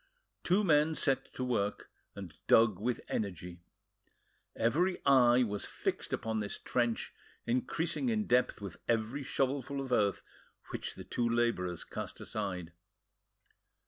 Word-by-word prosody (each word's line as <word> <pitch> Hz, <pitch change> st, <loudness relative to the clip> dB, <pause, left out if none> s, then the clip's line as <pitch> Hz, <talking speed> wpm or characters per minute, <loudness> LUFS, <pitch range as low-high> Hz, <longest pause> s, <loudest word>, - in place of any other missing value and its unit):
Two 190 Hz, +4 st, +3 dB
men 155 Hz, -2 st, +4 dB
set 135 Hz, -3 st, +1 dB
to 130 Hz, -, -2 dB
work, 105 Hz, -5 st, -1 dB, 0.2 s
and 95 Hz, -5 st, -8 dB
dug 110 Hz, -5 st, +5 dB
with 120 Hz, +2 st, -1 dB
energy. 90 Hz, -3 st, -4 dB, 0.9 s
Every 175 Hz, +11 st, +2 dB
eye 125 Hz, -2 st, +6 dB
was 105 Hz, -3 st, -3 dB
fixed -, -, -3 dB
upon 110 Hz, -1 st, -1 dB
this 105 Hz, -1 st, -3 dB
trench 120 Hz, -2 st, -1 dB, 0.3 s
increasing 160 Hz, -, 0 dB
in 215 Hz, -2 st, +1 dB
depth 125 Hz, -, +2 dB
with 100 Hz, -3 st, -7 dB
every 115 Hz, +4 st, 0 dB
shovelful 135 Hz, 0 st, -1 dB
of 135 Hz, -2 st, -5 dB
earth 105 Hz, -5 st, +2 dB, 0.5 s
which -, -, -5 dB
the -, -, -8 dB
two 120 Hz, -1 st, -1 dB
labourers 115 Hz, -7 st, 0 dB
cast -, -, -6 dB
aside. 90 Hz, -5 st, -4 dB
120 Hz, 130 wpm, -32 LUFS, 105-135 Hz, 0.9 s, eye